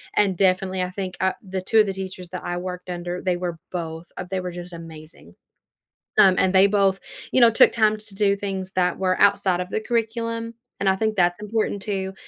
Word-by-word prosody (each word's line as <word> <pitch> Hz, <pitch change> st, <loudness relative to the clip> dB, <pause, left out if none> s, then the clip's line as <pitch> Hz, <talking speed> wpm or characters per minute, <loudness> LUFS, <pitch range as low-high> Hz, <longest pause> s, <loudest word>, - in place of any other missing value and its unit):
and 195 Hz, -4 st, +2 dB
definitely, 190 Hz, -1 st, +1 dB
I 180 Hz, -, -1 dB
think 190 Hz, -1 st, -5 dB
o 190 Hz, 0 st, +3 dB
the 190 Hz, -1 st, -4 dB
2 220 Hz, +4 st, +3 dB
of 215 Hz, -, +6 dB
the 195 Hz, -, -2 dB
teachers 185 Hz, -2 st, -7 dB
that 180 Hz, 0 st, -6 dB
I 175 Hz, -, -2 dB
worked 180 Hz, 0 st, -6 dB
under, 175 Hz, 0 st, -4 dB
they 180 Hz, -2 st, 0 dB
were 175 Hz, -2 st, -4 dB
both 165 Hz, -1 st, -5 dB
uh, -, -, -4 dB
they 190 Hz, -, 0 dB
were 180 Hz, -1 st, -4 dB
just 175 Hz, 0 st, -9 dB
amazing, 155 Hz, -, -12 dB, 0.8 s
um, 185 Hz, -1 st, +7 dB
and 190 Hz, 0 st, +2 dB
they 190 Hz, +1 st, +7 dB
both, 195 Hz, -2 st, +2 dB, 0.3 s
you 260 Hz, -, +3 dB
know, 235 Hz, -1 st, +8 dB
took 225 Hz, -, +5 dB
time 215 Hz, -1 st, +3 dB
to 210 Hz, -1 st, -10 dB
do 200 Hz, 0 st, +2 dB
things 190 Hz, -2 st, -4 dB
that 180 Hz, -1 st, +1 dB
were 185 Hz, -1 st, 0 dB
outside 195 Hz, -3 st, +3 dB
of 180 Hz, -, -4 dB
the 220 Hz, -, -1 dB
curriculum, 230 Hz, 0 st, -2 dB, 0.3 s
and 195 Hz, -, +2 dB
I 190 Hz, -, +4 dB
think 220 Hz, +1 st, -1 dB
that's 175 Hz, +1 st, +2 dB
important 210 Hz, -1 st, -2 dB
too, 190 Hz, -2 st, -3 dB
190 Hz, 220 wpm, -23 LUFS, 180-205 Hz, 0.8 s, know